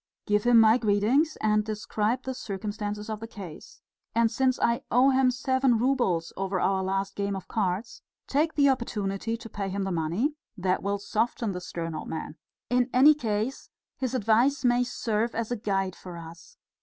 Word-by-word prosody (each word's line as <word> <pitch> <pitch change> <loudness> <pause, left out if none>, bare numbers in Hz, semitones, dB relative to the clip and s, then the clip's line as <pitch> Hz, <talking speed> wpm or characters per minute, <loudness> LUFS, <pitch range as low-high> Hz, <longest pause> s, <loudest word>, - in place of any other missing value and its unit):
Give 210 +1 +1
him 240 -1 +7
my 225 +2 +6
greetings 225 +9 +2
and 210 0 +2
describe 215 +3 -2
the 260 - -3
circumstances 210 -1 -5
of 215 -1 -4
the 225 - -7
case. 190 -8 -11 0.3
And 230 -1 +3
since 260 +1 +1
I 235 0 +2
owe 255 +3 +5
him 260 -1 +4
seven 260 0 +2
roubles 230 -10 +1
over 195 0 -2
our 190 0 +1
last 195 +1 -2
game 200 0 -2
of 190 - -7
cards, 195 -1 -2 0.2
take 305 +3 0
the 285 -1 +4
opportunity 225 -4 -1
to 230 - -10
pay 200 -2 -4
him 195 +1 -2
the 195 - -2
money; 175 - 0 0.2
that 185 0 0
will 200 +1 -1
soften 215 +2 -1
the 180 -1 -5
stern 165 -2 -5
old 155 - -6
man. 160 -1 -5 0.3
In 245 +1 +2
any 275 +5 +7
case 230 -2 -3 0.3
his 260 -1 -2
advice 250 +5 +2
may 245 0 +4
serve 230 -2 -1
as 230 0 -2
a - - +1
guide 195 -4 -1
for 180 -2 -9
us. 165 0 -12
215 Hz, 180 wpm, -27 LUFS, 195-245 Hz, 0.3 s, him